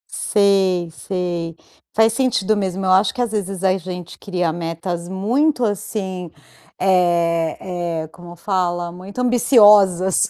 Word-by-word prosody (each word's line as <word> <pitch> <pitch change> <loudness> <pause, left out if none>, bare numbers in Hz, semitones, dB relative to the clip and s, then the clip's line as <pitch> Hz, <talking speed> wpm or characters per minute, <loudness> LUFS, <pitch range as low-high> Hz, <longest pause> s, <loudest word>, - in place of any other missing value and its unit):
Sei, 190 -4 +2
sei, 175 -2 -4 0.3
faz 220 0 +3
sentido 225 -5 +1
mesmo. 190 -1 -2
Eu 185 - +2
acho 190 +2 +4
que - - -8
às 240 -3 -1
vezes 195 -3 -4
a 190 -1 +3
gente 180 -1 -8
cria 180 -4 -2
metas 170 +1 -5
muito, 245 +8 +1
assim, 190 -3 -4 0.5
eh 170 -3 +1 0.5
eh, - - -8
como 175 +1 -13
fala? 175 -1 -2
Muito 185 +6 -10
ambiciosas. 210 -7 +4
185 Hz, 130 wpm, -20 LUFS, 175-205 Hz, 0.5 s, acho